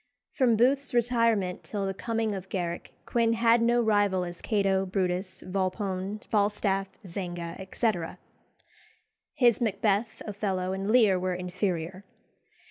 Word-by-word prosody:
From 250 -4 +3
Booth's 265 +4 +2
retirement 230 -6 +2
till 205 -2 -3
the 195 - -1
coming 225 +2 -1
of 190 -1 -6
Garrick, 175 -3 -3
Quin 230 -1 +2
had 230 0 +4
no 240 +1 +3
rival 205 -4 +2
as 175 -1 -8
Cato, 195 -3 +1
Brutus, 185 0 -2
Volpone, 190 +1 -2
Falstaff, 200 -2 +1 0.2
Zanga, 175 -2 -5
etc. 190 -3 -2 1.2
His 245 -4 +4
Macbeth, 215 0 0
Othello, 190 -3 -2
and 195 +1 -3
Lear 215 -6 +5
were 185 0 -1
inferior. 180 0 -3
195 Hz, 125 wpm, -28 LUFS, 185-225 Hz, 1.2 s, Lear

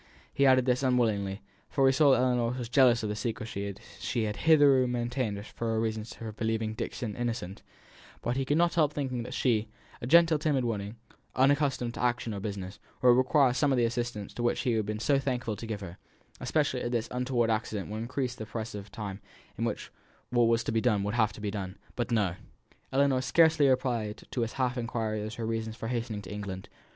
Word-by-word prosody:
He 140 0 +4
added 130 -1 +5
this 125 0 +2
unwillingly; 110 -7 +1 0.3
for 135 -2 +2
he 135 - +6
saw 145 +1 +5
that 130 - +5
Ellinor 125 -1 +1
was 120 -2 -5
jealous 125 -3 +5
of 105 - -1
the 105 - -2
secresy 105 -3 -4 0.2
she 120 -3 -1
had 105 -1 -2
hitherto 145 -5 +5
maintained 120 -3 -2
as 100 - -10
to - - -26
her 115 -1 0
reasons 110 0 -3
for 115 -1 -6
believing 110 0 -2
Dixon 110 0 -4
innocent; 115 -6 -4 0.6
but 120 - 0
he 135 - 0
could 145 +3 +1
not 175 0 +3
help 150 -3 +2
thinking 130 -4 -2
that 115 - -6
she, 115 -4 +1 0.3
a 120 - -4
gentle, 165 +1 +6
timid 145 -4 +1
woman, 105 -2 -3 0.4
unaccustomed 135 -3 +2
to - - -6
action 120 -2 0
or 100 - -4
business, 100 -1 -5 0.2
would 125 - +7
require 130 +1 +4
some 145 +2 +2
of 130 - +2
the 120 - +3
assistance 120 -3 -3
which 120 0 +1
he 125 - +1
would 115 - +1
have 110 - 0
been 105 0 -2
so 140 +4 +2
thankful 125 -5 -2
to 115 +3 -8
give 105 -2 -4
her; 85 -2 -8 0.4
especially 145 -5 0
as - - -2
this 120 -2 -1
untoward 125 -2 +1
accident 110 -2 -2
would 105 - -4
increase 125 +1 -2
the 110 -4 -8
press 110 +1 -5
of 100 -1 -8
time 100 -1 -6 0.3
in - - -2
which - - -4 0.4
what 120 -1 +4
was 115 0 +2
to - - -2
be 115 0 +1
done 105 -5 +2
would 105 +1 -2
have 110 -3 +2
to 105 - -11
be 105 -1 -2
done. 95 -2 -5 0.2
But 120 - -2
no. 105 -7 +1 0.6
Ellinor 135 -1 +3
scarcely 155 0 +4
replied 120 -5 0
to 125 - -1
his 115 0 -2
half 125 -1 -1
inquiry 110 -2 -2
as 105 +1 -5
to 115 - -5
her - - -1
reasons 110 0 -3
for 115 - -5
hastening 115 -4 -3
to 95 - -9
England. 100 -2 -6
120 Hz, 220 wpm, -29 LUFS, 110-130 Hz, 0.6 s, would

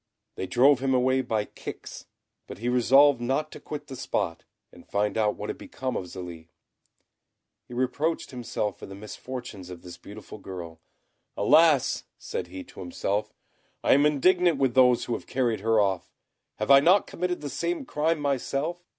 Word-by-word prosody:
They 95 - -5
drove 135 +5 +5
him 135 0 +1
away 130 +1 +3
by 110 -4 -1
kicks; - - -9 0.4
but - - -8
he 120 +3 -2
resolved 130 +2 +5
not 135 +5 -1
to - - -9
quit 150 -1 -7
the 135 -3 -8
spot, 90 -8 -2 0.3
and - - -17
find 105 0 0
out 105 -2 +1
what - - -4
had - - -10
become 130 -1 -5
of 90 - -3
Zélie. 85 -2 -9 1.2
He 120 - -9
reproached 145 +7 -1
himself 115 -5 -3
for - - -9
the 95 - -9
misfortunes 105 -2 -8
of 90 -2 -10
this 90 -1 -10
beautiful 105 +1 -11
girl. 85 -4 -8 0.6
"Alas!" 155 -4 +4
said 90 - -5
he 95 +1 -8
to - - -15
himself, 100 +3 -2 0.5
"I - - +5
am 145 +2 +5
indignant 175 +3 +3
with 135 -3 +1
those 125 -1 +5
who 120 - -2
have - - -5
carried 120 -5 0
her 110 +2 +2
off. 95 -3 0 0.4
Have 105 +5 0
I 140 - +10
not 180 +8 +5
committed 180 -1 -3
the 145 - -4
same 315 - -2
crime 160 -4 0
myself? 145 +4 -2
125 Hz, 175 wpm, -27 LUFS, 105-145 Hz, 1.2 s, I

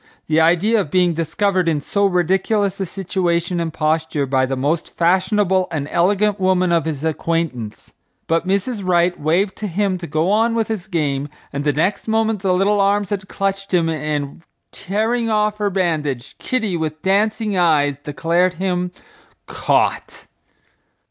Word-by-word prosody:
The 160 +1 +2
idea 185 +7 +3
of 155 - -6
being 180 +1 +2
discovered 175 +3 0
in 155 -2 0
so 200 +7 +1
ridiculous 190 +2 +1
a 190 - -2
situation 175 -2 -1
and 165 -1 -2
posture 155 -1 0
by 130 -1 +1
the 135 - -2
most 145 +5 -2
fashionable 185 +2 +2
and 150 -4 -3
elegant 200 +4 +2
woman 185 -1 +2
of 170 -3 +2
his 155 -3 -3
acquaintance! 160 -8 -3 0.3
But 165 +2 0
Mrs. 200 +3 -1
Wright 175 -1 +2
waved 180 +6 +1
to 215 - -4
him 190 0 -1
to 170 - -7
go 160 +5 0
on 225 +2 +2
with 225 -1 0
his 215 -5 -4
game 145 -4 -1 0.2
and 140 +1 -2
the 145 - +2
next 165 +11 -1
moment 220 -1 +1
the 195 -2 +1
little 200 +2 +2
arms 200 0 +1
had 190 -2 -3
clutched 195 -1 -2
him, 165 -2 +2
and, 150 -1 -3 0.3
tearing 225 +4 -1
off 210 -1 +1
her 205 -1 +1
bandage, 155 -9 -2
Kitty, 225 -8 -1
with 155 -1 -4
dancing 210 +2 +1
eyes, 150 -5 +3
declared 170 +5 0
him 180 0 -1 0.6
"caught." - - -1
180 Hz, 160 wpm, -19 LUFS, 160-200 Hz, 0.6 s, idea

